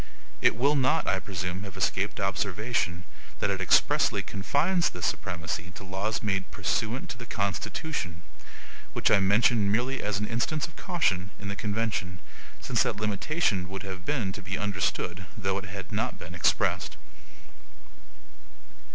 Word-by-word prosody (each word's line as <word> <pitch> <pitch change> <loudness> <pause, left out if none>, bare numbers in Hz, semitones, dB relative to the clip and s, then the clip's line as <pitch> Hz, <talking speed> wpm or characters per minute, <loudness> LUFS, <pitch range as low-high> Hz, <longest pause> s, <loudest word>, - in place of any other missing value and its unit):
It - - +5
will 140 +6 +3
not, 135 +4 +3
I 95 - +2
presume, 90 -1 -3
have 100 -1 -8
escaped 95 +1 +1
observation, 95 -1 0 0.4
that - - +1
it - - -1
EXPRESSLY - - +4
confines 150 - +2
this 90 -2 -4
supremacy 90 -3 -2
to - - -8
laws 95 +4 -2
made 95 -3 0
PURSUANT 115 +4 -1
TO 120 - -7
THE 115 - -8
CONSTITUTION; 100 - -2 0.7
which - - +2
I - - +7
mention 100 +1 +4
merely 125 +5 +1
as 105 -1 0
an 105 - -1
instance 125 +7 0
of 165 - -12
caution 100 - +1
in 100 - -5
the 100 - -2
convention; 105 -4 -1 0.4
since 120 -2 +1
that 120 -4 +2
limitation 105 - 0
would 95 0 -5
have 95 -1 -6
been 115 -6 0
to 100 - -7
be 95 0 -3
understood, 95 -3 -1
though 95 -1 0
it 100 - -8
had 95 -1 -7
not 110 +4 -1
been 85 - -8
expressed. 85 - +1
100 Hz, 150 wpm, -28 LUFS, 95-115 Hz, 0.7 s, I